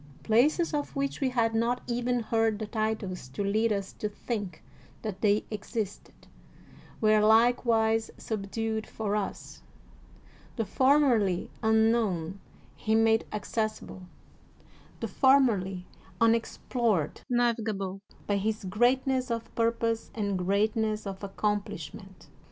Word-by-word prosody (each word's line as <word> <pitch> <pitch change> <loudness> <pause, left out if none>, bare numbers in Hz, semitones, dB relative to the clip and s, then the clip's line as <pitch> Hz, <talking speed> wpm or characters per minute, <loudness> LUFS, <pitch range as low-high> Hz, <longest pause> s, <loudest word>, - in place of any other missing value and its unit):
Places 295 +10 +3
of 295 0 -2
which 275 +1 -2
we 265 - +2
had 230 -3 +1
not 235 +2 +1
even 245 0 0
heard 225 -1 +1
the 215 - -4
titles 215 - -3
to 135 +10 -4
lead 215 +3 +1
us 200 -2 -2
to 210 - -3
think 205 -6 -5 0.4
that 210 -4 -5
they 210 0 +3
existed, 210 -1 -5 0.7
were 215 -1 +4
likewise 225 0 +3
subdued 220 +1 -3
for 210 -2 -2
us: 210 -2 -4 0.9
the 225 - -1
formerly 245 -6 +3
un 220 0 +4
known 195 -6 -1 0.4
he 215 +10 0
made 225 0 +3
accessible, 215 -1 -3 1.0
the - - -1
formerly 215 -10 +3 0.3
unex 230 0 +2
plored 215 - +1
navigable 220 -6 0 0.2
by 205 - +1
his 215 +2 -2
greatness 255 +6 +1
of 230 -1 -4
purpose 230 0 0
and 205 -3 -1
greatness 215 +3 0
of 195 0 -6
accomplishment. 200 -2 -4
220 Hz, 115 wpm, -28 LUFS, 200-230 Hz, 1.0 s, were